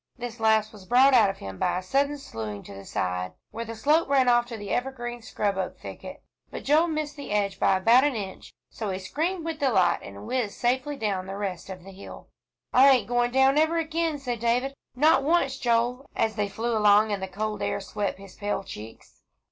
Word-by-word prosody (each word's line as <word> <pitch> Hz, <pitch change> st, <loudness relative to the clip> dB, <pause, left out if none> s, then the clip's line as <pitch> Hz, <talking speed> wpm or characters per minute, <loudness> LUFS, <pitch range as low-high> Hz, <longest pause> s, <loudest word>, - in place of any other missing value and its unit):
This 240 Hz, -2 st, -6 dB
last 220 Hz, -1 st, +2 dB
was 195 Hz, -3 st, -14 dB
brought 260 Hz, +3 st, +5 dB
out 225 Hz, -5 st, +6 dB
of 195 Hz, -, -5 dB
him 95 Hz, -1 st, -8 dB
by -, -, +1 dB
a 185 Hz, -, -4 dB
sudden 280 Hz, +8 st, +1 dB
slewing 110 Hz, -, -7 dB
to -, -, -11 dB
the 100 Hz, 0 st, -10 dB
side, 90 Hz, 0 st, -2 dB, 0.2 s
where 230 Hz, -, -5 dB
the 230 Hz, 0 st, -7 dB
slope 295 Hz, +8 st, +2 dB
ran 270 Hz, -2 st, +3 dB
off 240 Hz, 0 st, +4 dB
to 235 Hz, -2 st, -6 dB
the 205 Hz, -1 st, -7 dB
evergreen, 240 Hz, -2 st, -3 dB
scrub 200 Hz, -3 st, -2 dB
oak 185 Hz, -, -3 dB
thicket; -, -, -9 dB, 0.3 s
but -, -, -7 dB
Joel 310 Hz, +4 st, +4 dB
missed 305 Hz, -2 st, -3 dB
the 285 Hz, -, -8 dB
edge 200 Hz, -2 st, 0 dB
by 190 Hz, -, +3 dB
about 230 Hz, +7 st, +5 dB
an 290 Hz, -3 st, +1 dB
inch, 195 Hz, -3 st, -6 dB, 0.2 s
so 215 Hz, -3 st, -5 dB
he 185 Hz, -, -2 dB
screamed 325 Hz, -, -3 dB
with 325 Hz, -2 st, -4 dB
delight, 215 Hz, -11 st, +3 dB
and 100 Hz, +1 st, -10 dB
whizzed 245 Hz, -6 st, -2 dB
safely 260 Hz, +4 st, 0 dB
down 195 Hz, -5 st, -2 dB
the 195 Hz, +1 st, -5 dB
rest 195 Hz, -3 st, -4 dB
of 185 Hz, -2 st, -8 dB
the 195 Hz, -, -11 dB
hill. 195 Hz, +1 st, -11 dB, 0.4 s
"I 265 Hz, +2 st, +7 dB
ain't 260 Hz, -3 st, +4 dB
going 245 Hz, 0 st, +1 dB
down 265 Hz, +3 st, +4 dB
ever 320 Hz, +2 st, +2 dB
again," 325 Hz, -1 st, -1 dB
said 250 Hz, -4 st, -4 dB
David, 245 Hz, +4 st, 0 dB, 0.2 s
"not 300 Hz, +4 st, +4 dB
once, 280 Hz, -3 st, +2 dB
Joel," 245 Hz, +3 st, 0 dB
as 220 Hz, -, +1 dB
they 205 Hz, -2 st, -1 dB
flew 225 Hz, +3 st, -2 dB
along 210 Hz, 0 st, +5 dB
and 200 Hz, -2 st, -2 dB
the 190 Hz, -, -3 dB
cold 210 Hz, +3 st, -4 dB
air -, -, -1 dB
swept 200 Hz, 0 st, -3 dB
his 195 Hz, -1 st, -13 dB
pale 205 Hz, -1 st, -3 dB
cheeks. 110 Hz, -, -11 dB
230 Hz, 220 wpm, -26 LUFS, 195-270 Hz, 0.4 s, I